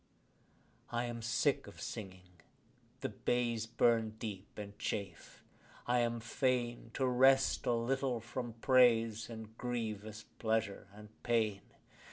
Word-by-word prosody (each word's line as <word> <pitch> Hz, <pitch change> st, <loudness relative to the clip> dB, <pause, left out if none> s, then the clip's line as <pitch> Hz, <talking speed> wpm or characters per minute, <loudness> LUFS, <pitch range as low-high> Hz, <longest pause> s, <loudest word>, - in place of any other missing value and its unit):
I 120 Hz, +1 st, 0 dB
am 120 Hz, -1 st, -5 dB
sick 115 Hz, +1 st, +1 dB
of -, -, -12 dB
singing: 90 Hz, -4 st, -8 dB, 0.6 s
the -, -, -1 dB
bays 120 Hz, -2 st, 0 dB
burn 115 Hz, -1 st, +2 dB
deep 105 Hz, -3 st, -7 dB
and 100 Hz, -1 st, -7 dB
chafe: 95 Hz, -5 st, -5 dB, 0.4 s
I 125 Hz, 0 st, +2 dB
am 120 Hz, 0 st, +1 dB
fain 120 Hz, 0 st, -1 dB
To 135 Hz, -, +1 dB
rest 130 Hz, +1 st, +4 dB
a 120 Hz, -, +4 dB
little 125 Hz, +1 st, 0 dB
from 120 Hz, +1 st, -5 dB
praise 115 Hz, -4 st, +4 dB
and 110 Hz, -1 st, -8 dB
grievous 110 Hz, -3 st, -3 dB, 0.2 s
pleasure 110 Hz, -3 st, 0 dB
and 105 Hz, +1 st, -12 dB
pain. 110 Hz, -4 st, +1 dB
115 Hz, 125 wpm, -35 LUFS, 110-120 Hz, 0.6 s, rest